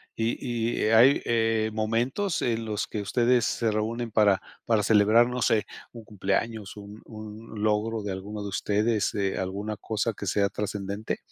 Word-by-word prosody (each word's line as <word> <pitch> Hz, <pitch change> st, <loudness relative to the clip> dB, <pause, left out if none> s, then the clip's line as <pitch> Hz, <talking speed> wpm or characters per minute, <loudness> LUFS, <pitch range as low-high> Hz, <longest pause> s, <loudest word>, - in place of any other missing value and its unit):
Y 115 Hz, 0 st, -1 dB
y, -, -, +2 dB
¿hay, 120 Hz, +5 st, +6 dB
eh, 115 Hz, -1 st, +1 dB
momentos 120 Hz, -, -1 dB
en 115 Hz, -1 st, 0 dB
los 105 Hz, -1 st, -2 dB
que 105 Hz, -, -4 dB
ustedes 120 Hz, +3 st, +2 dB
se 115 Hz, -2 st, 0 dB
reúnen 115 Hz, +2 st, -2 dB
para 100 Hz, -2 st, +4 dB, 0.3 s
para 110 Hz, -3 st, +2 dB
celebrar, 110 Hz, +3 st, +5 dB
no 125 Hz, 0 st, -3 dB
sé, 110 Hz, -1 st, +2 dB, 0.3 s
un 115 Hz, -2 st, -10 dB
cumpleaños, 105 Hz, +1 st, -2 dB
un 105 Hz, +1 st, -10 dB
un 110 Hz, -1 st, -8 dB
logro 110 Hz, +1 st, 0 dB
de 100 Hz, -, -3 dB
alguno 100 Hz, +2 st, -6 dB
de 100 Hz, -, -4 dB
ustedes, 105 Hz, +3 st, 0 dB
eh, 100 Hz, -2 st, -1 dB
alguna 100 Hz, +3 st, -3 dB
cosa 110 Hz, +2 st, -2 dB
que 100 Hz, -, -7 dB
sea 100 Hz, +1 st, +2 dB
trascendente? 100 Hz, 0 st, -4 dB
110 Hz, 165 wpm, -27 LUFS, 105-115 Hz, 0.3 s, hay